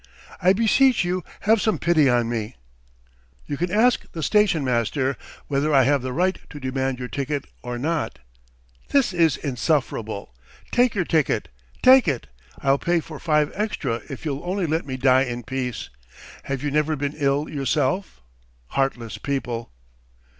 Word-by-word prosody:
I 180 - +5
beseech 230 +3 +4
you 180 0 -1 0.2
have 220 0 +3
some 220 - +1
pity 160 -5 +3
on 120 -2 +2
me!" 115 0 -3 0.9
"You 145 - -3
can 175 +5 -1
ask 225 +6 +2
the 160 - -4
station 210 -7 +3
master... 130 +2 0 0.3
whether 145 +1 +1
I 135 - +6
have 140 +1 +2
the 130 0 -4
right 185 +7 +1
to 145 - -9
demand 130 -1 -2
your 125 0 -5
ticket 140 +2 -3 0.2
or 125 0 -5
not." 160 +5 -2 0.7
"This 270 -9 +2
is 165 -5 +3
insufferable! 125 - -2 0.4
Take 245 -2 +3
your 185 -3 +1
ticket... 160 -3 +1 0.3
take 260 -4 +7
it! 135 -6 -1 0.4
I'll 135 0 +3
pay 175 0 +1
for 155 -2 -9
five 150 -2 +2
extra 205 - -2
if 135 +2 -7
you'll 140 -2 -3
only 185 +1 -1
let 160 -1 -1
me 130 -1 -4
die 130 0 +4
in 120 -1 -5
peace! 125 -1 -4 0.6
Have 135 -1 -3
you 145 - -1
never 150 +1 +1
been 145 0 -2
ill 145 0 +1
yourself? 140 - -1 0.5
Heartless 125 -4 -2
people!" 125 -5 -3
145 Hz, 160 wpm, -23 LUFS, 130-175 Hz, 0.9 s, take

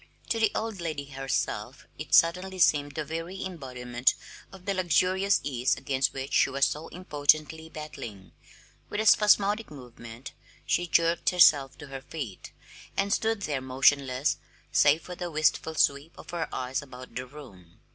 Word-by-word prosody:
To 230 - 0
the 220 -2 +4
old 220 -4 -3
lady 155 -4 -4
herself 135 -1 -3
it - - +1
suddenly 180 +3 +3
seemed 145 -4 +3
the 155 - -3
very 165 +5 -5
embodiment 125 -8 -1 0.4
of 190 -2 -14
the 200 - 0
luxurious 185 +2 +2
ease 130 -2 0
against 135 -1 0
which 135 +1 -6
she - - +4
was 135 0 +2
so 155 +2 -4
impotently 155 -1 0
battling. 135 -11 -9 0.6
With 205 - -3
a 220 - 0
spasmodic 210 0 +4
movement 120 -3 -11 0.3
she 175 - 0
jerked 165 0 +2
herself 145 -7 +5
to - - -10
her 135 -1 -7
feet, 135 - -7 0.5
and 200 +1 +1
stood 220 -2 0
there 145 -6 -2
motionless 130 +1 +2 0.3
save 150 +3 +4
for 180 - -8
the 175 0 -5
wistful 160 0 +1
sweep 140 +2 +1
of - - -11
her 170 -2 -3
eyes 130 +2 -3
about 130 -3 -12
the 130 +2 -5
room. 100 - -14
150 Hz, 155 wpm, -28 LUFS, 135-180 Hz, 0.6 s, herself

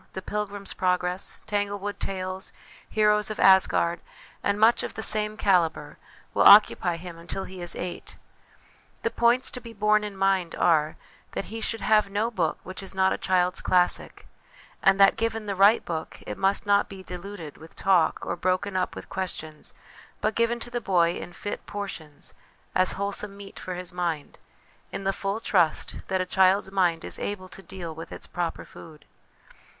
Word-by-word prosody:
The 190 - -6
Pilgrims 205 -1 -2
Progress? 180 0 -1
Tanglewood 205 -1 -2
Tales? 185 0 -4 0.4
Heroes 210 -1 +2
of 215 - -5
Asgard? 180 -3 +5 0.4
and 200 +1 0
much 225 +2 +5
of - - -5
the 220 - -3
same 215 0 +2
calibre, 180 -6 +1 0.4
will - - +1
occupy 200 -4 +7
him 170 -1 -9
until 175 +3 -5
he 185 -1 -9
is 175 - -3
eight. 180 0 -6 0.9
The 230 - 0
points 240 +2 +3
to 250 - -6
be 230 -1 -10
borne 210 0 +2
in 205 -2 -6
mind 190 -3 +1
are, 155 -2 +2 0.4
that - - -3
he 225 - -5
should 225 0 -2
have 215 -2 +3
no 210 +4 -1
book 170 -8 0
which 185 +1 -7
is 195 0 -5
not 190 0 +3
a - - -2
child's 180 -1 +1
classic; 180 -1 +1 0.6
and 195 0 +4
that, 195 - +6
given 225 -1 -1
the 200 - -2
right 200 +4 +5
book, 160 -2 -5
it - - -5
must 195 +2 +1
not 200 0 +3
be 195 -1 -9
diluted 180 -3 -8
with 160 +1 -14
talk 185 -4 +2
or - - -2
broken 185 +2 -1
up 185 -1 -1
with - - -8
questions, 160 -5 -5 0.5
but 215 - 0
given 235 +1 +1
to 240 - -6
the 240 0 -2
boy 175 -5 +3
in - - -7
fit 205 +3 -6
portions 170 -8 -6 0.4
as 185 0 +3
wholesome 200 0 -3
meat 200 -1 -10
for 185 - -5
his 180 0 -6
mind, 170 -5 -3 0.5
in 195 - -5
the 195 0 +1
full 195 +3 -3
trust 175 -8 +1
that 190 -1 0
a - - -1
child's 190 +1 +3
mind 175 -4 +1
is - - -3
able 195 -2 -4
to 195 - -9
deal 180 -4 -7
with 160 +1 -9
its - - -6
proper 175 -2 -4
food. 155 -2 -14
195 Hz, 180 wpm, -26 LUFS, 180-205 Hz, 0.9 s, occupy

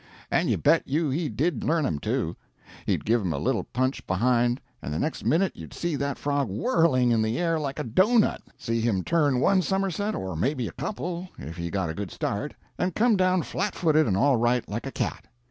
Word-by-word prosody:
And - - +2
you - - +2
bet - - +3
you 150 +1 0
he 155 +3 -1
did 135 +5 -1
learn 160 -1 +1
him, 75 - -1
too. - - -1 0.5
He'd - - 0
give 115 +2 +3
him 90 -4 -1
a - - -3
little - - 0
punch 130 +2 -2
behind, 120 +5 +2 0.2
and 70 - -5
the 75 - -2
next 155 - -2
minute 185 +4 +2
you'd - - -10
see 170 -3 -2
that 140 -1 -2
frog 145 -4 -1
whirling 130 - +2
in 115 -1 +3
the 110 +1 0
air 165 -2 +1
like 140 -2 -3
a 150 - -2
doughnut 205 - +3 0.2
see 115 -1 -1
him 105 -5 +1
turn 145 -6 +2
one 190 +7 +4
summerset, 195 +2 -1
or 95 -2 -4
maybe 125 - 0
a - - -6
couple, 180 -2 -4
if 80 +5 -8
he 85 0 -4
got 90 -3 -1
a - - -5
good 100 +2 -5
start, 105 - -3 0.2
and 180 -1 0
come 230 0 +4
down 185 -2 +2
flat 205 - -2
footed 155 -3 +3
and 95 -3 +1
all 135 +4 +4
right, 120 +1 +1
like 115 +6 -4
a - - -5
cat. - - -3
140 Hz, 220 wpm, -26 LUFS, 115-170 Hz, 0.5 s, one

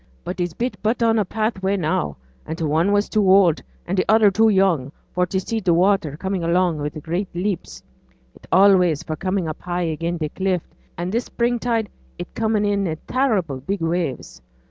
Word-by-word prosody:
But 180 +2 -5
it's 175 -2 -2
but 245 +2 -2
a - - -18
bit 230 +2 0
on 225 -1 +3
a 210 - +1
pathway 200 -3 -1
now; 115 - -1 0.3
an' 160 - -3
t' 165 - -5
one 160 +5 +2
was 205 0 +2
too 205 -4 +2
oud, 185 -5 +5 0.2
an' 180 - -2
t' 185 - +3
other 215 -2 +6
too 220 +3 +4
young 185 -10 +2 0.2
for 180 0 +1
t' 190 - -2
see 220 +4 -2
t' 190 - -1
water 170 -4 +2
comin' 190 0 -2
along 170 -1 +1
wi' 145 0 -2
great 170 +6 -3
leaps; 175 - -3 0.5
it's - - -18
allays 180 -4 +5
for 155 - -4
comin' 185 +2 -1
high 175 -1 -2
up - - -1
again' 170 +2 -3
t' 155 -2 -2
cliff, 185 0 -1 0.3
an' 175 +2 -3
this 235 +3 -1
spring 240 0 0
tide 230 -3 0 0.3
it's 175 - -7
comin' 220 -2 0
in 200 -1 +1
i' 160 -1 -3
terrible 205 - 0
big 190 +7 -3
waves. 165 - -2
185 Hz, 205 wpm, -22 LUFS, 165-205 Hz, 0.5 s, other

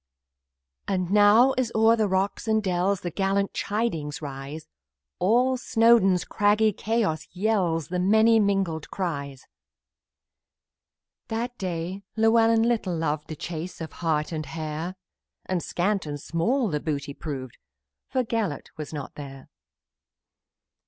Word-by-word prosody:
And 185 -2 -1
now, 210 +5 +6
as 240 -3 0
over 220 -1 +4
rocks 190 +3 -1
and 220 -1 +2
dells, 185 +1 0
The 175 - -4
gallant 195 +2 0
chidings 185 -9 -2
rise, 140 +1 -7 0.5
All 245 +7 +3
Snowdon's 225 -6 +4
craggy 210 +1 +2
chaos 205 -7 -1
yells 180 -5 0
With 180 0 0
many 220 +4 +5
mingled 195 -6 0
cries. 140 -8 -4 1.8
That 235 +2 -3
day 180 +1 -3
Llewellyn 225 0 +4
little 220 -7 0
loved 155 -1 -2
The 155 - -6
chase 170 +3 -6
of 160 -1 -6
hart 160 -1 -1
or 155 - -2
hare, 160 +3 -5 0.5
And 185 -2 -1
small 175 +5 0
and 145 -2 -5
scant 220 - 0
the 150 - 0
booty 145 -2 -3
proved, 135 -5 -7 0.5
For 255 - +1
Gelert 220 - -3
was 155 -1 -6
not 145 -3 -6
there. 135 -2 -10
185 Hz, 125 wpm, -26 LUFS, 160-220 Hz, 1.8 s, now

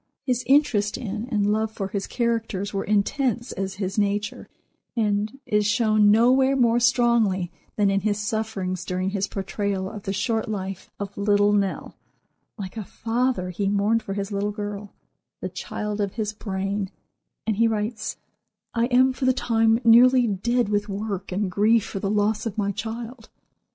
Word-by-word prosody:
His 250 -2 0
interest 250 -7 +3
in 220 -1 -4
and 205 -3 +2
love 220 +1 0
for 195 -3 -4
his 195 0 -3
characters 225 -5 -1
were 195 - -1
intense 235 +3 0
as 190 0 -4
his 195 +1 -2
nature, 205 +1 -1 0.5
and 210 +1 0
is 210 -5 +2
shown 215 -2 +4
nowhere 255 +5 +5
more 240 -2 +3
strongly 235 -7 +2 0.2
than 205 -2 +3
in 195 - +2
his 205 0 0
sufferings 210 -4 -2
during 185 +1 -2
his 200 0 -1
portrayal 195 -1 -2
of 205 +2 -7
the 195 - -3
short 220 +3 -1
life 195 -2 -5
of 200 0 -5
"Little 205 0 +3
Nell," 200 -2 -1 0.6
like 195 +2 -7
a 215 - -3
father 225 -3 -1
he 195 +2 -1
mourned 205 +3 +2
for 195 -2 -5
his 200 0 -3
little 200 +1 -1
girl—the 205 -1 -8
child 210 0 -4
of 200 -2 -1
his 215 -2 -2
brain—and 200 +1 -5
he 230 +1 +4
writes: 220 0 -2 0.6
"I 230 0 +2
am, 255 +1 +4
for 260 - -3
the 260 - +4
time, 225 -2 +2
nearly 245 +2 +7
dead 235 +4 0
with 205 0 -1
work 200 -1 -4
and 190 0 -1
grief 215 +3 +3
for 195 - -5
the 195 - -2
loss 210 +2 +1
of 220 -1 -6
my 200 -1 0
child." 225 +3 -6
210 Hz, 165 wpm, -24 LUFS, 200-230 Hz, 0.6 s, nearly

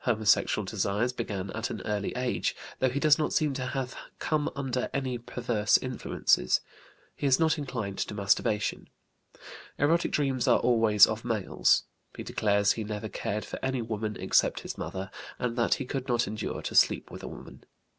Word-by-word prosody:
Homosexual 110 -3 +2
desires 110 +6 0
began 100 -5 -4
at 110 +2 -3
an - - -5
early 105 -2 -1
age, 125 0 -1 0.2
though 130 - +3
he 135 +3 -2
does 150 0 +5
not 150 - 0
seem 150 -2 +2
to 130 -1 -3
have 130 -1 -3 0.2
come 150 -1 0
under 130 -2 -2
any 130 -3 -1
perverse 115 -3 +1
influences. 65 - +1 0.6
He 145 - -1
is 130 -1 +4
not 160 -1 +2
inclined 115 -8 -4
to 105 - -2
masturbation. 105 +1 0 0.9
Erotic 165 +4 +2
dreams 135 -4 0
are - - +6
always 115 -4 +5
of 110 +1 -4
males. 110 -5 +2 0.3
He - - -5
declares 100 -1 +2
he 110 - -2
never 105 +1 -5
cared 105 +1 -3
for - - -6
any 130 -2 -1
woman 110 -1 -3
except - - +2
his - - -6
mother, 95 0 -5 0.3
and 120 -2 -2
that 120 -1 +2
he 135 - -5
could 135 0 -4
not 120 -2 +2
endure 110 +2 -4
to - - -4
sleep - - +3
with - - -8
a - - -7
woman. - - -11
120 Hz, 175 wpm, -28 LUFS, 105-130 Hz, 0.9 s, are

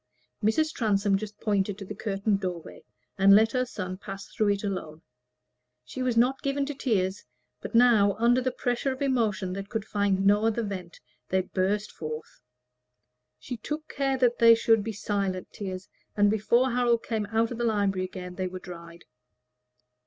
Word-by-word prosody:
Mrs. 310 +9 +2
Transome 205 -3 +1
just 210 +1 -5
pointed 200 -2 0
to 200 - -8
the - - -6
curtained 200 -1 -1
doorway, 180 -4 -6 0.4
and 195 +1 +7
let 220 +2 +5
her 255 0 0
son 185 -5 -5
pass 195 -1 -8
through 215 - -1
it 200 0 0
alone. 170 -6 -5 0.8
She 255 - -6
was 250 -2 0
not 255 +3 +3
given 275 0 -1
to 290 - -4
tears: 205 -8 -1 0.4
but - - -6
now, 230 -4 +5
under 240 +3 +3
the 255 - 0
pressure 245 +2 -1
of 260 +2 -4
emotion 220 -8 0
that 195 +1 -6
could 220 -3 -3
find 200 -2 0
no 205 +2 +4
other 225 +1 0
vent, 185 -4 -6 0.3
they 190 0 +2
burst 195 +3 -1
forth. 155 -3 -7 1.0
She 245 - -7
took 300 +7 -5
care 270 -1 0
that 245 -2 +2
they 230 0 +8
should 225 -1 +3
be 225 - -3
silent 200 -3 -3
tears, 185 -2 -6 0.3
and 205 0 +4
before 235 +4 +2
Harold 240 -1 +2
came 220 -3 -2
out 225 +2 0
of 240 - -5
the - - 0
library 200 -4 +1
again 180 -1 -8
they 185 0 -3
were 185 0 -6
dried. 170 -2 -11
205 Hz, 175 wpm, -27 LUFS, 190-235 Hz, 1.0 s, they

